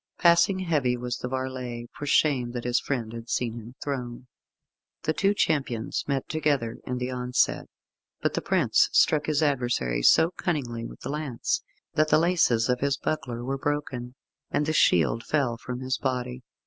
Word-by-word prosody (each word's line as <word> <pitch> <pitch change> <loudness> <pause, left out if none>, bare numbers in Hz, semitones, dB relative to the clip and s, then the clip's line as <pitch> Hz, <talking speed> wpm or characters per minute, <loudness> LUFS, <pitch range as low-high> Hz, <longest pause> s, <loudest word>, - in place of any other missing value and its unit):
Passing 170 +3 +5
heavy 145 -9 +1
was 120 0 -3
the - - -4
varlet, 130 -2 -4
for 145 - -6
shame 130 -5 +2
that 120 -1 -4
his 120 0 +2
friend 115 -5 -3
had 115 0 -8
seen 115 0 0
him 115 +3 -12
thrown. 125 -3 -4 0.8
The 155 - +1
two 200 +5 +2
champions 135 - 0
met 140 -2 -1
together 145 -7 0
in 125 - -2
the 125 +1 -3
onset, 125 0 0 0.5
but - - 0
the - - -1
prince - - +3
struck 150 -1 +4
his 155 0 +2
adversary 120 - 0
so 160 - +5
cunningly 125 -11 -3
with - - -13
the - - -5
lance, 145 -5 -2 0.3
that 155 0 +3
the - - +6
laces 160 -9 +3
of 125 0 +1
his 140 0 +1
buckler 125 -7 -3
were 135 +1 -2
broken, 135 -4 -3 0.3
and 150 - 0
the 155 - 0
shield 90 - +3
fell 135 -6 0
from 125 +2 -6
his 130 0 -1
body. 125 -1 -2
130 Hz, 175 wpm, -26 LUFS, 120-150 Hz, 0.8 s, the